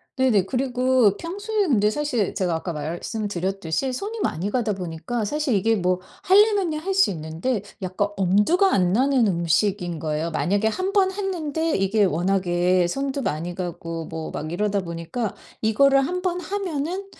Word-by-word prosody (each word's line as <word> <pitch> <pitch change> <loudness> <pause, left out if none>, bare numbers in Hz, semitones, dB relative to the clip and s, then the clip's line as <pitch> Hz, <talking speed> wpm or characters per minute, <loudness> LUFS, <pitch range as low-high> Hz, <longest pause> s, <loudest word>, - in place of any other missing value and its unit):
네네. 250 -8 +3
그리고 255 -4 +2
평소에 405 +4 -2
근데 210 -6 +3
사실 255 -7 -1
제가 185 -4 0
아까 170 +1 -4
말씀드렸듯이 190 - -3
손이 420 - -4
많이 185 - -1
가다 225 -2 0
보니까 180 +5 -4
사실 295 +3 -1
이게 220 +3 +2
뭐 180 -2 +1 0.2
하려면야 390 -5 +4
할 380 +4 -2
수 390 - +5
있는데 165 +8 -3 0.2
약간 185 +2 -1
엄두가 210 - +3
안 180 -2 +3
나는 260 0 +3
음식인 175 0 0
거예요. 155 +1 -2
만약에 200 +7 +1
1 370 - -2
번 385 -2 +3
했는데 330 -5 -2
이게 195 +2 +2
워낙에 180 0 +1
손도 275 +7 -2
많이 170 - -2
가고 170 -2 -5
뭐 160 0 -6
막 155 +1 -5
이러다 205 +3 0
보니까 170 +6 -4 0.3
이거를 275 +6 +4
1 360 +6 -2
번 360 -1 0
하면은 365 -1 -3
210 Hz, 320 characters per minute, -23 LUFS, 175-295 Hz, 0.3 s, 수